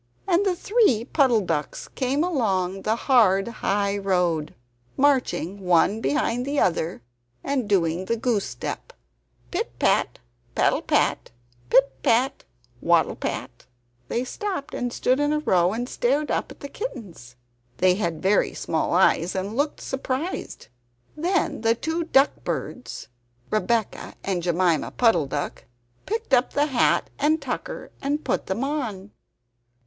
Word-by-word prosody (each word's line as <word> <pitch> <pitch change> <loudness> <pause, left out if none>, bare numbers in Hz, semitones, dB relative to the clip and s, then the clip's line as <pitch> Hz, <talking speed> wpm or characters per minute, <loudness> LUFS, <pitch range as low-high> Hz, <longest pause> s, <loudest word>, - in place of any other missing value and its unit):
and 365 +1 +3
the 380 -3 +1
three 405 - +2
Puddle 260 -5 +3
ducks 160 -6 -3
came 270 +4 0
along 195 - 0
the 215 +2 +1
hard 220 -6 +3
high 205 -3 -1
road, 180 -6 0 0.4
marching 245 - +1
one 185 +4 +2
behind 245 -2 0
the 280 +2 -1
other 165 -7 0 0.4
and 260 -6 -1
doing 175 -2 +1
the 230 +4 -1
goose 225 -3 0
step 125 -1 -6 0.6
pit - - -3
pat, - - +2 0.4
paddle - - +2
pat! - - +1 0.4
pit 270 +1 +4
pat, 255 +4 +2 0.4
waddle 170 -1 +3
pat! - - -5 0.4
They 240 - -1
stopped 370 +3 -4
and 245 0 -2
stood 255 +2 +1
in 290 0 +2
a 305 - +2
row 185 - +2
and 240 +3 -3
stared 280 +5 0
up - - -1
at - - -13
the 280 - -5
kittens. 205 - -8 0.4
They 185 0 +4
had 170 -5 -3
very 195 +2 +2
small 160 +1 -1
eyes 180 -1 +3
and 195 +3 -3
looked 290 +3 -1
surprised. 265 - -4 0.5
Then 345 - 0
the 225 0 +3
two 320 +6 -2
duck 275 -3 +3
birds, 250 - -5 0.4
Rebeccah 220 0 -1
and 190 -3 -1
Jemima 175 -2 +1
Puddle 225 - +3
duck, 145 +1 -4 0.4
picked 445 -6 -3
up 250 0 +3
the 290 - +3
hat 265 -5 +2
and 310 +3 +2
tucker 285 - -5
and 290 +2 -1
put - - -1
them 205 +7 -2
on. 230 -9 -3
230 Hz, 140 wpm, -24 LUFS, 185-280 Hz, 0.6 s, pit